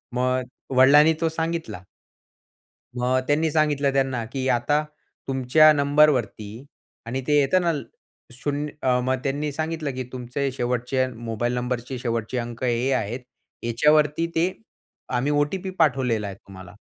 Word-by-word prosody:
मग 130 +1 +1 0.3
वडिलांनी 145 +4 +7
तो 165 - +2
सांगितला. 160 - -3 1.2
मग 125 +1 +1
त्यांनी 155 +2 +2
सांगितलं 145 -3 +1
त्यांना 135 -3 0
की 135 -1 -2
"आता 145 +6 +2 0.4
तुमच्या 135 +4 +5
नंबर 145 +1 +4
वरती" 115 -1 -3 0.4
आणि 130 +3 -3
ते 150 0 +4
येत 140 +4 +2
ना 170 -1 +2 0.6
शून्य 145 +3 -3
अ, 125 -1 +2
मग 130 +1 +1
त्यांनी 145 +2 -2
सांगितलं 155 -1 -3
की 130 - -3
"तुमचे 130 +2 -3
शेवटचे 125 +1 -1
मोबाईल 115 +1 -3
नंबरचे 125 +1 -3
शेवटचे 115 0 -2
अंक 120 0 -5
हे 125 +2 +1
आहेत. 110 +5 -2 0.4
याच्यावरती 150 +6 +2
ते 175 +3 +2 0.6
आम्ही 130 +4 +1
ओ-टी-पी 155 +6 0
पाठवलेला 125 -9 +2
आहे 95 - -7
तुम्हाला." 95 -2 -13
130 Hz, 135 wpm, -24 LUFS, 120-150 Hz, 1.2 s, वडिलांनी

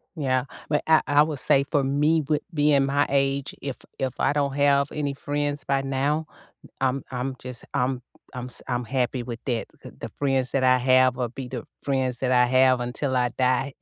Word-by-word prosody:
Yeah. 130 -5 0 0.2
But 150 -1 +1
I 160 -1 +5
I 145 0 +5
would 150 -3 -4
say 140 +1 +3
for 145 -3 +2
me, 150 +4 +2
with 150 -1 +1
being 145 -2 +3
my 145 +1 +2
age, 140 0 0
if 135 -3 -4 0.2
if 130 -2 -1
I - - +2
don't 140 -2 0
have 140 0 +3
any 145 -2 -2
friends 145 0 -2
by 135 0 +1
now, 140 +3 -1 0.6
I'm 135 0 0
I'm 130 +1 -3
just 125 -1 -7
I'm 130 -2 0 0.3
I'm 125 -1 -5
s 125 - -5
I'm 125 -1 -1
happy 125 +1 -1
with 120 -1 -6
that. 120 -4 -2
The - - -10
the - - -8
friends 135 -2 +1
that 135 - +1
I 130 0 +5
have 130 0 +4
will 125 -2 -2
be 130 +2 -7
the 125 -3 -6 0.2
friends 130 -3 0
that 130 -1 0
I 125 -1 +5
have 130 0 +4
until 130 +2 -2
I 125 -1 +2
die. 130 +1 +1
135 Hz, 205 wpm, -25 LUFS, 125-145 Hz, 0.6 s, I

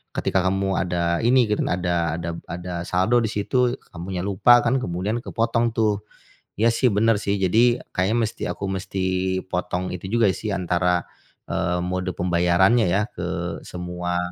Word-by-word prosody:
ketika 95 - +1
kamu 95 +1 0
ada 85 -1 0
ini 125 +3 +4
gitu 105 - 0
kan, - - -1
ada 90 -1 0 0.2
ada 85 0 -4
b - - -7
ada 90 +1 -6
saldo 95 +7 +2
di - - +1
situ, 125 +4 +1 0.2
kamunya 90 +1 -5
lupa 100 +5 +5
kan, 130 - +2
kemudian 100 +2 -2
kepotong 115 0 0
tuh." 105 -3 +1 0.6
Iya 115 - +5
sih 125 +2 +2
benar 110 +1 +3
sih, 100 +1 0
jadi 120 +6 +3
kayaknya 100 +5 +1
mesti 110 - -4
aku - - -5
mesti 95 0 -3 0.5
potong 90 +1 -2
itu 90 +1 -6
juga 115 -4 +4
sih 105 +1 -4
antara, 90 -1 +1 0.5
eee, 90 0 0
mode 90 +1 -2
pembayarannya 90 +6 +3
ya 95 +4 +2
ke - - -5 0.4
semua 90 0 -4
95 Hz, 165 wpm, -23 LUFS, 90-115 Hz, 0.6 s, lupa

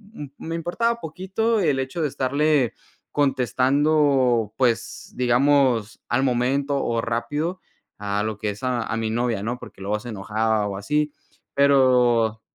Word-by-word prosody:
un 145 -7 -8
me 165 +1 -5
importaba 230 +8 -1
poquito 195 +6 -1
el 150 -6 +2
hecho 130 +5 -3
de 155 - +2
estarle 140 -1 +1 0.4
contestando, 135 -3 +2
pues, 120 -3 -1
digamos, 125 -2 +2
al 125 +3 +1
momento 135 +2 0
o 115 -1 0
rápido 145 +10 -2 0.4
a 100 0 -1
lo 110 -1 -3
que 105 - -2
es, 105 +3 -11
a 125 -2 0
a 115 - -1
mi 110 -1 -1
novia, 115 -3 -1
¿no? 120 +3 -3
Porque - - -12
luego 105 +2 -1
se 120 - -8
enojaba 110 +1 -1
o 100 -1 -4
así. 150 +8 -1 0.4
Pero 125 -5 +3
125 Hz, 150 wpm, -23 LUFS, 115-145 Hz, 0.4 s, Pero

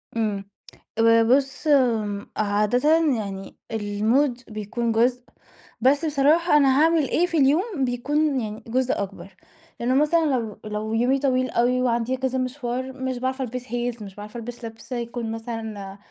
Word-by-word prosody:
امم، 210 -3 -1 0.5
ب - - +4 0.2
بُصّ 270 +4 +1 0.7
عادةً 215 +9 +2 0.2
يعني 195 -2 -6 0.2
المود 225 +5 0
بيكون 220 +2 -3
جزء، 245 +2 +2 0.6
بس 280 +5 +3
بصراحة 300 +3 +3
أنا 275 0 +4
هاعمل 325 -3 +3
إيه 350 - +2
في 335 - -2
اليوم 300 - +2
بيكون 280 +4 0
يعني 215 0 -6
جزء 255 +2 +1
أكبر. 195 -1 -10 0.4
لأنه 250 +2 +1
مثلًا 315 +3 +3
لو 235 -8 -1
لو 215 +1 -3
يومي 250 +4 +2
طويل 255 -2 +1
أوي 250 +2 +2
وعندي 240 +1 0
كذا 260 0 -1
مشوار، 255 0 -3
مش 260 -1 -3
باعرف 260 +1 -2
ألبس 250 0 -4
heels 240 -1 -3
مش 195 -2 -9
باعرف 210 +3 -10
ألبس 240 +1 -7
لِبْس 225 +3 -11
يكون 235 -1 -4
مثلًا 220 -4 -6
245 Hz, 145 wpm, -24 LUFS, 225-270 Hz, 0.7 s, ب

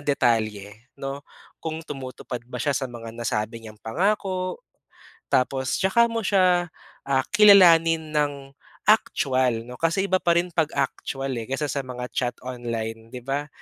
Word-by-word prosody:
detalye 110 -5 0
'no. 135 +1 -5 0.4
Kung 160 0 -4
tumutupad 130 -2 -6
ba 125 - -12
siya 145 - +1
sa 135 - -1
mga 115 -1 -8
nasabi 115 0 -3
niyang 110 -1 -11
pangako, 185 - -1 0.7
tapos 130 0 +1
'tsaka 235 +5 +4
mo 230 0 -1
siya 180 -3 +3 0.4
ah 135 -1 +1
kilalanin 165 -7 +6
ng 140 -2 -1 0.3
actual 130 - +2
'no. 125 - -8
Kasi 175 +4 +1
iba 185 - +4
pa 170 -1 +3
rin 180 - -1
'pag 160 -2 +1
actual 135 -1 -2
eh, 115 - -4
kaysa 145 +2 -1
sa 140 -1 -2
mga 125 -1 -5
chat 120 -1 0
online 115 -2 -5
'di 125 - -5
ba. 140 +3 -2
135 Hz, 150 wpm, -24 LUFS, 120-165 Hz, 0.7 s, kilalanin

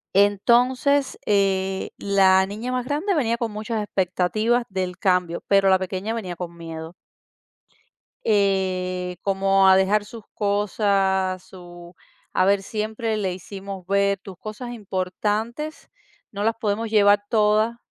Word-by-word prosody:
Entonces, 245 +7 +3
eh, 195 -2 +1
la 190 -1 +4
niña 220 +5 -5
más 255 -1 -1
grande 300 +9 -1
venía 235 -8 +1
con 230 -2 -3
muchas 215 +1 -3
expectativas 205 +5 0
del 185 -2 -3
cambio, 180 -3 0
pero 195 -1 +4
la 190 - +5
pequeña 190 +4 -3
venía 185 -6 -5
con 170 -1 -7
miedo. 165 0 -8 1.3
Eh, 185 -3 0
como 195 0 +3
a 190 - +7
dejar 200 +2 +2
sus 225 +1 -11
cosas, 195 -2 0
su 175 -1 -13 0.4
a 185 - +3
ver, 200 0 +3
siempre 220 +2 -3
le 195 -4 -1
hicimos 195 0 -8
ver: 200 0 +2
"Tus 195 0 -11
cosas 215 +5 -7
importantes, 215 +7 -3 0.4
no 205 0 -4
las 225 +1 +1
podemos 220 +1 -1
llevar 205 -1 +4
todas, 215 +1 +2
200 Hz, 130 wpm, -23 LUFS, 190-220 Hz, 1.3 s, a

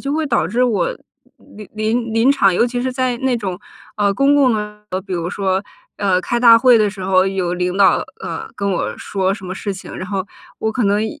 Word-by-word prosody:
就 275 +1 -3
会 315 0 0
导 235 - +1
致 235 +7 0
我 245 - 0 0.6
临 210 -3 -10
临 220 +2 -1
临 230 +4 +3
场 200 -9 +3
尤 235 - +3
其 245 0 -3
是 260 0 -2
在 255 -1 -1
那 260 -1 0
种， 190 -5 -4 0.4
呃， 200 -1 +2
公 275 +7 +3
共 270 -4 +4
的 220 - 0 0.2
比 210 - -25
如 185 - -1 0.8
说， - - -26 0.2
呃， 190 -3 +2
开 240 0 -1
大 230 -2 +8
会 250 0 +6
的 210 - +3
时 190 -2 -8
候 185 0 +3
有 190 -2 -1
领 180 +1 -2
导， 200 -1 +5 0.2
呃， - - -5
跟 200 -1 -2
我 - - -2
说 190 -1 -1
什 200 - -11
么 185 - -5
事 200 +1 -4
情， 185 - -10
然 185 - -6
后 195 -1 -3 0.3
我 220 0 -1
可 245 - -1
能 205 +2 +2
一 295 +7 -6
215 Hz, 245 characters per minute, -18 LUFS, 195-245 Hz, 0.8 s, 大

